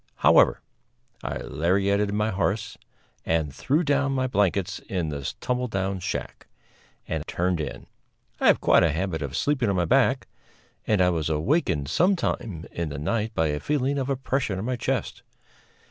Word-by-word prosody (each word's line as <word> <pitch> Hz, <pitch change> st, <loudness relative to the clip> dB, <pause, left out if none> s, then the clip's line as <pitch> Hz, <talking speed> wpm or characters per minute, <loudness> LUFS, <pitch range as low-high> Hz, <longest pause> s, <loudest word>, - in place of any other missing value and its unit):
However, -, -, +5 dB, 0.6 s
I -, -, -3 dB
lariated 100 Hz, +6 st, +1 dB
my 105 Hz, +1 st, 0 dB
horse 100 Hz, +2 st, -1 dB, 0.5 s
and 80 Hz, -4 st, 0 dB
threw 145 Hz, -, +1 dB
down 140 Hz, -2 st, +1 dB
my 130 Hz, -1 st, 0 dB
blankets 100 Hz, -5 st, 0 dB
in 90 Hz, -5 st, -1 dB
this 70 Hz, -3 st, -4 dB
tumble 125 Hz, 0 st, -1 dB
down 95 Hz, -3 st, -2 dB
shack, -, -, -5 dB, 0.6 s
and 80 Hz, -2 st, -2 dB
turned 90 Hz, -1 st, 0 dB
in. -, -, -6 dB, 0.5 s
I -, -, +3 dB
have -, -, +6 dB
quite -, -, +5 dB
a 80 Hz, -, +3 dB
habit 80 Hz, -1 st, -2 dB
of 70 Hz, -2 st, -3 dB
sleeping 135 Hz, -6 st, +1 dB
on 100 Hz, -, +1 dB
my 90 Hz, -1 st, +1 dB
back, -, -, +3 dB, 0.6 s
and 105 Hz, -4 st, +3 dB
I 90 Hz, -, +3 dB
was 80 Hz, -2 st, -1 dB
awakened 80 Hz, -, +1 dB
some 185 Hz, -, +3 dB
time 100 Hz, -, -3 dB
in 85 Hz, -2 st, -3 dB
the 70 Hz, -, -6 dB
night 110 Hz, +9 st, -2 dB
by 80 Hz, -1 st, +2 dB
a 75 Hz, 0 st, -1 dB
feeling 140 Hz, -, 0 dB
of 135 Hz, 0 st, -2 dB
oppression 130 Hz, -6 st, -1 dB
on 95 Hz, -, -4 dB
my 130 Hz, +1 st, -1 dB
chest. 120 Hz, -, -2 dB
100 Hz, 170 wpm, -25 LUFS, 80-125 Hz, 0.6 s, have